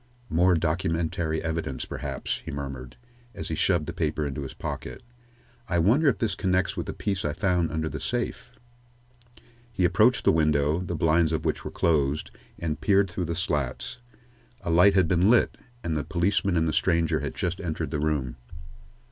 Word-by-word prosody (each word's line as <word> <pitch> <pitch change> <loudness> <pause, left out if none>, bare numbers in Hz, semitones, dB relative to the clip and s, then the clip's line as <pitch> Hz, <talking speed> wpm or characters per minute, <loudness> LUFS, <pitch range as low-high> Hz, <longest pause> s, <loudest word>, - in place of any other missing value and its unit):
"More 90 +3 +4
documentary 80 -1 -1
evidence, 80 -5 -3
perhaps," - - -4
he - - -8
murmured, 70 -3 -6 0.4
as 95 - -5
he - - -2
shoved 85 -1 +2
the - - -5
paper 80 -2 -1
into 70 0 -4
his 70 - -7
pocket. - - -6 0.7
"I 85 - +1
wonder 115 - +4
if 135 - +3
this 110 -4 0
connects 95 -1 0
with - - -4
the - - -3
piece 100 -2 -2
I 75 - -1
found 90 0 +1
under 80 0 -1
the - - -5
safe?" - - -3 1.2
He 95 -6 +1
approached - - +3
the - - +6
window, 75 0 +2
the 90 -1 -4
blinds 80 +1 +3
of 80 - -2
which - - -1
were - - -4
closed, 75 -3 +1 0.3
and 80 -2 -3
peered 100 -2 +3
through 90 0 -2
the 85 0 -2
slats. 75 - -2 0.6
A 85 - -2
light 90 +4 +6
had 95 -3 +4
been 90 +3 +3
lit, 120 - +4 0.3
and 80 -2 -1
the 75 - -1
policeman 95 0 +1
and 80 0 +2
the 80 - 0
stranger 85 -3 +2
had - - -4
just 90 +2 -2
entered 80 -4 -3
the 75 - -1
room. 75 -5 -1
80 Hz, 180 wpm, -26 LUFS, 75-90 Hz, 1.2 s, the